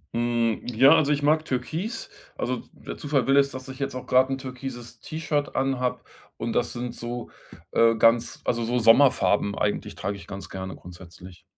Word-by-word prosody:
Hm, 120 Hz, -2 st, 0 dB
ja, 130 Hz, +4 st, +5 dB
also 150 Hz, -2 st, +2 dB
ich 145 Hz, 0 st, 0 dB
mag 155 Hz, +2 st, +3 dB
türkis, 160 Hz, -, -4 dB, 0.3 s
also -, -, -1 dB
d -, -, -13 dB, 0.2 s
der -, -, -6 dB
Zufall 140 Hz, -4 st, 0 dB
will 135 Hz, +1 st, +3 dB
es, 140 Hz, 0 st, +5 dB
dass 130 Hz, -1 st, -8 dB
ich 130 Hz, +1 st, -9 dB
jetzt 135 Hz, -1 st, -3 dB
auch 130 Hz, -, -6 dB
gerade 130 Hz, +1 st, +3 dB
'n 135 Hz, -, -1 dB
türkises 130 Hz, -2 st, -8 dB
T-Shirt 155 Hz, -2 st, -3 dB
anhabe 130 Hz, -2 st, 0 dB, 0.4 s
und 115 Hz, 0 st, -3 dB
das 120 Hz, -, 0 dB
sind 120 Hz, 0 st, -5 dB
so, 120 Hz, 0 st, -6 dB, 0.4 s
äh, 115 Hz, 0 st, +4 dB
ganz 115 Hz, +1 st, +3 dB
also, 115 Hz, -1 st, 0 dB
so 120 Hz, +2 st, 0 dB
Sommerfarben 115 Hz, -4 st, +4 dB
eigentlich 105 Hz, -, -2 dB
trage 100 Hz, 0 st, -3 dB
ich 95 Hz, -3 st, -12 dB
ganz 100 Hz, 0 st, -8 dB
gerne 95 Hz, -1 st, -6 dB
grundsätzlich. 90 Hz, 0 st, -13 dB
125 Hz, 185 wpm, -25 LUFS, 115-135 Hz, 0.4 s, ja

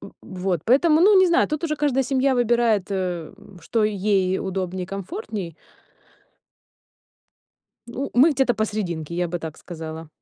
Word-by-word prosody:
В -, -, -10 dB
э. -, -, -13 dB
Вот. 185 Hz, -3 st, -3 dB
Поэтому 270 Hz, +8 st, +4 dB
ну 395 Hz, +2 st, +6 dB
не 375 Hz, -, +6 dB
знаю, 345 Hz, 0 st, +3 dB
тут 305 Hz, +2 st, -3 dB
уже 305 Hz, -2 st, -1 dB
каждая 285 Hz, -3 st, +1 dB
семья 265 Hz, 0 st, +1 dB
выбирает, 235 Hz, -5 st, +1 dB
э, 180 Hz, -4 st, -3 dB, 0.3 s
что 225 Hz, -2 st, 0 dB
ей 195 Hz, -2 st, +1 dB
удобнее 185 Hz, -1 st, -3 dB
и -, -, -5 dB
комфортней. 195 Hz, -, -6 dB, 2.3 s
Ну 255 Hz, +4 st, -5 dB
мы 275 Hz, +7 st, +6 dB
где-то 265 Hz, -3 st, +1 dB
посрединке, 180 Hz, -7 st, -3 dB
я 175 Hz, 0 st, -1 dB
бы 175 Hz, +1 st, -3 dB
так 160 Hz, -2 st, -7 dB
сказала. 160 Hz, -1 st, -8 dB
205 Hz, 155 wpm, -23 LUFS, 180-265 Hz, 2.3 s, ну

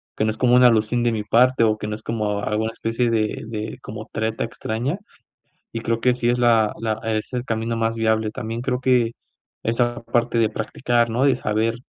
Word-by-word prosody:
que 110 Hz, -, 0 dB
no -, -, +1 dB
es 110 Hz, -, -8 dB
como 125 Hz, -1 st, +3 dB
una 125 Hz, 0 st, +7 dB
alusión 115 Hz, +1 st, +2 dB
de 120 Hz, -, +2 dB
mi 110 Hz, -2 st, -2 dB
parte, 125 Hz, +3 st, +4 dB
o 110 Hz, -1 st, +3 dB
que 105 Hz, -, -5 dB
no 105 Hz, -, -3 dB
es 110 Hz, -, -12 dB
como 105 Hz, -3 st, -1 dB
alguna 110 Hz, +2 st, -1 dB
especie 115 Hz, +2 st, -1 dB
de 110 Hz, -1 st, -1 dB
de 110 Hz, +1 st, -5 dB
como 110 Hz, -1 st, -8 dB
treta 110 Hz, 0 st, -2 dB
extraña, 120 Hz, -, -3 dB, 0.7 s
y 115 Hz, -, -4 dB
creo 115 Hz, 0 st, -1 dB
que 125 Hz, -, +4 dB
sí 120 Hz, -1 st, 0 dB
es 120 Hz, 0 st, +1 dB
la 115 Hz, -3 st, +4 dB
la 110 Hz, -1 st, -2 dB
es 110 Hz, -1 st, -2 dB
el 125 Hz, 0 st, -2 dB
camino 115 Hz, 0 st, -2 dB
más 115 Hz, 0 st, 0 dB
viable, 110 Hz, -1 st, +1 dB
también 115 Hz, +1 st, -5 dB
creo 125 Hz, 0 st, -1 dB
que, 125 Hz, -3 st, +3 dB, 0.5 s
esa 120 Hz, +1 st, 0 dB
parte 120 Hz, 0 st, 0 dB
de 110 Hz, -1 st, +3 dB
practicar, 120 Hz, +2 st, 0 dB
¿no?, 120 Hz, +4 st, +1 dB
de 135 Hz, -2 st, +4 dB
saber 110 Hz, -1 st, 0 dB
115 Hz, 215 wpm, -22 LUFS, 110-120 Hz, 0.7 s, una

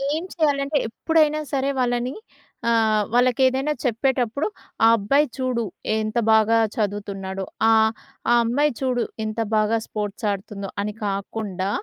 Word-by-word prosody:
ఏం 320 Hz, -, -3 dB
చేయాలంటే 290 Hz, -2 st, +1 dB
ఎప్పుడైనా 305 Hz, +5 st, +2 dB
సరే 275 Hz, 0 st, +1 dB
వాళ్ళని 245 Hz, +1 st, 0 dB, 0.6 s
ఆహ్, 220 Hz, -2 st, +3 dB
వాళ్ళకెదైనా 260 Hz, +3 st, +3 dB
చెప్పేటప్పుడు 250 Hz, +1 st, 0 dB, 0.4 s
ఆ -, -, +8 dB
అబ్బాయి 275 Hz, +9 st, +3 dB
చూడు 255 Hz, -3 st, -1 dB, 0.4 s
ఎంత 215 Hz, +1 st, -2 dB
బాగా 220 Hz, +1 st, +5 dB, 0.2 s
చదువుతున్నాడో 195 Hz, -2 st, -3 dB, 0.2 s
ఆహ్, 220 Hz, 0 st, +5 dB, 0.4 s
ఆ -, -, +6 dB
అమ్మాయి 285 Hz, +6 st, +2 dB
చూడు 255 Hz, -3 st, 0 dB, 0.2 s
ఎంత 215 Hz, +1 st, -4 dB, 0.2 s
బాగా 215 Hz, +1 st, +2 dB
స్పోర్ట్స్ 210 Hz, 0 st, -4 dB
ఆడుతుందో 200 Hz, 0 st, -6 dB
అని 210 Hz, +1 st, -3 dB
కాకుండా 195 Hz, -1 st, -3 dB
230 Hz, 120 wpm, -23 LUFS, 210-265 Hz, 0.6 s, ఆ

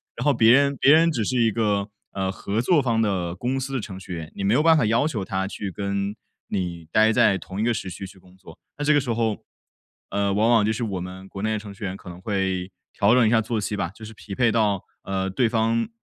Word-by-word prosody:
然 125 Hz, -, -4 dB
后 145 Hz, -, +4 dB
别 115 Hz, -1 st, +5 dB
人 140 Hz, +2 st, +4 dB
别 140 Hz, -, +6 dB
人 165 Hz, +1 st, +5 dB
只 120 Hz, -8 st, -1 dB
是 125 Hz, +2 st, 0 dB
一 115 Hz, -1 st, +3 dB
个， 105 Hz, -2 st, 0 dB, 0.2 s
呃， 95 Hz, -1 st, -2 dB
合 100 Hz, +3 st, -2 dB
作 150 Hz, +4 st, +3 dB
方 115 Hz, -3 st, +1 dB
的 90 Hz, -5 st, -1 dB
公 125 Hz, +7 st, -2 dB
司 135 Hz, +1 st, -5 dB
的 130 Hz, -, -1 dB
程 95 Hz, -2 st, -8 dB
序 90 Hz, -1 st, -8 dB
员， 80 Hz, -2 st, -6 dB
你 100 Hz, -, -4 dB
没 100 Hz, +3 st, +2 dB
有 150 Hz, -, +3 dB
办 165 Hz, 0 st, +6 dB
法 125 Hz, -, +2 dB
要 115 Hz, +7 st, +2 dB
求 110 Hz, -11 st, -3 dB
他 95 Hz, -1 st, -2 dB
去 100 Hz, 0 st, -5 dB
跟 100 Hz, +1 st, -3 dB, 0.3 s
你 85 Hz, -3 st, -4 dB
呆 110 Hz, +1 st, +5 dB
在 115 Hz, -4 st, +4 dB
同 95 Hz, +1 st, -8 dB
一 -, -, +1 dB
个 120 Hz, +1 st, +2 dB
时 100 Hz, -3 st, -4 dB
区 95 Hz, +2 st, -7 dB
去 95 Hz, -, -15 dB
工 90 Hz, 0 st, -20 dB
作。 85 Hz, -4 st, -14 dB, 0.2 s
那 145 Hz, -, -3 dB
这 150 Hz, -, +4 dB
个 145 Hz, -, +4 dB
时 125 Hz, -, -3 dB
候， 110 Hz, -2 st, -1 dB, 0.6 s
呃， 100 Hz, -1 st, 0 dB
往 110 Hz, +3 st, +2 dB
往 115 Hz, -3 st, +4 dB
就 110 Hz, -, +1 dB
是 110 Hz, +2 st, -3 dB
我 95 Hz, -5 st, -3 dB
们 95 Hz, +1 st, -8 dB
国 95 Hz, -, -8 dB
内 110 Hz, +1 st, 0 dB
的 105 Hz, -, -1 dB
程 100 Hz, -1 st, -10 dB
序 100 Hz, -, -11 dB
员 95 Hz, -1 st, -3 dB
可 95 Hz, -, -16 dB
能 90 Hz, +1 st, -9 dB
会 95 Hz, -2 st, -2 dB, 0.2 s
调 100 Hz, +3 st, +3 dB
整 125 Hz, -3 st, +5 dB
一 -, -, +3 dB
下 115 Hz, -1 st, +4 dB
作 110 Hz, 0 st, -2 dB
息 105 Hz, +1 st, -2 dB
吧， 85 Hz, -4 st, -2 dB
就 110 Hz, -, -11 dB
是 110 Hz, -, -10 dB
匹 105 Hz, -1 st, -10 dB
配 120 Hz, +1 st, +3 dB
到， 105 Hz, -4 st, +1 dB, 0.2 s
呃， 95 Hz, 0 st, -2 dB
对 115 Hz, +4 st, +1 dB
方， 115 Hz, 0 st, +1 dB
105 Hz, 290 characters per minute, -24 LUFS, 95-115 Hz, 0.6 s, 别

